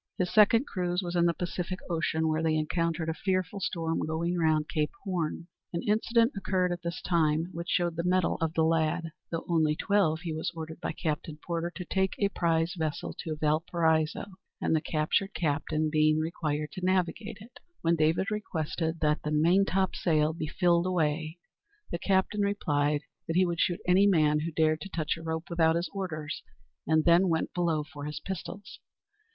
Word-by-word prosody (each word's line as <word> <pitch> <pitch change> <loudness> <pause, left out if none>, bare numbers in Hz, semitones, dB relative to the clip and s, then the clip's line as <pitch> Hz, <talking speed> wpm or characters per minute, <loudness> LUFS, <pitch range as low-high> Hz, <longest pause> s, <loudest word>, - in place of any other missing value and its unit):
His 180 -1 -1
second 225 +4 +6
cruise 180 -4 -2
was 175 0 -4
in 170 0 +4
the 170 - +2
Pacific 180 +1 -3
Ocean, 160 -1 0
where 155 0 +1
they 160 -1 +2
encountered 165 +1 -1
a 160 - 0
fearful 185 +2 -1
storm 165 -3 -1
going 170 +3 -1
round 155 -3 +2
Cape 150 -1 0
Horn. 175 -4 -2 0.3
An 170 - -2
incident 230 +3 +2
occurred 185 -2 0
at 175 -1 -3
this 170 0 -5
time 165 -1 +1
which 170 +1 -6
showed 175 -2 +1
the 170 - -1
mettle 180 0 +2
of 165 0 -1
the 160 - +3
lad. 165 +1 +1 0.2
Though 165 -1 -4
only 160 -3 +2
twelve, 170 -5 +1
he 170 -3 -4
was 160 +1 -2
ordered 160 +1 -7
by - - -2
Captain 155 -1 -3
Porter 170 0 -2
to 180 - -6
take 190 +1 0
a 200 - +2
prize 165 -2 +1
vessel 160 -3 -3
to 160 -2 -3
Valparaiso, 160 +1 +1 0.3
the 160 -1 +1
captured 155 +6 0
captain 155 -1 0
being 155 0 +4
required 155 -2 -2
to 185 - -7
navigate 185 +4 0
it. 230 +5 -14 0.2
When 170 0 +3
David 165 +6 +1
requested 165 -5 -2
that 150 0 +2
the 150 - -3
"maintopsail 170 -1 +2
be 155 - -3
filled 175 +2 +2
away," 160 -2 0 0.5
the 170 - -2
captain 195 +3 +1
replied 150 -7 +1 0.3
that 165 - -2
he 185 +1 +5
would 170 -1 -2
shoot 180 +2 +1
any 190 +3 +5
man 155 -5 +4
who 165 +2 -3
dared 155 0 +2
to 195 - -7
touch 155 -4 -1
a 165 - -10
rope 160 0 -4
without 165 -1 +3
his 170 +1 -2
orders, 160 -6 -4 0.5
and 160 0 +3
then 175 +2 +5
went 160 -1 0
below 165 -4 +1
for 145 -1 -9
his 150 -1 -4
pistols. 190 +4 -7
165 Hz, 180 wpm, -29 LUFS, 155-180 Hz, 0.5 s, second